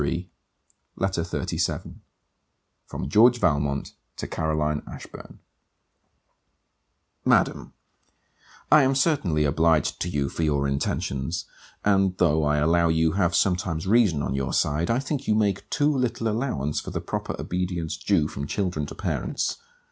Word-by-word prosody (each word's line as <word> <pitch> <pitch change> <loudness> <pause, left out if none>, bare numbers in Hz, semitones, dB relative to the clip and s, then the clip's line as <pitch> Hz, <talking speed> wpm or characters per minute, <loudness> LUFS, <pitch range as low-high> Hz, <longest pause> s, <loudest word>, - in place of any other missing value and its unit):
FILMAR 85 +5 -1 0.7
LETTER 95 -3 -1
XXXVII 85 - -3 0.9
FROM 65 - -5
GEORGE 115 - +5
VALMONT 70 - 0 0.2
TO - - -4
CAROLINE 75 -1 -1
ASHBURN - - -10 1.9
Madam, - - +2 1.0
I 150 - +8
am 135 0 +2
certainly 130 - +2
obliged 80 +1 +2
to 90 - -1
you 70 -4 -1
for 85 - -5
your 70 -3 +1
intentions; 70 +2 -2 0.4
and 95 -2 +3
though 80 -3 +3
I 75 0 +2
allow 85 +3 +3
you 80 0 +2
have 90 -2 +1
sometimes 90 -4 0
reason 95 -8 +3
on 65 - -2
your 70 -1 -2
side, 75 +4 +1
I 115 - +2
think 140 +1 -3
you 105 - +3
make 100 -3 0
too 150 0 +2
little 120 -3 -1
allowance 105 - -1
for - - -7
the - - -3
proper - - -4
obedience 90 -3 -2
due 80 0 +1
from 70 -2 -6
children 90 -5 -2
to - - -9
parents. - - -2
85 Hz, 140 wpm, -25 LUFS, 75-105 Hz, 1.9 s, I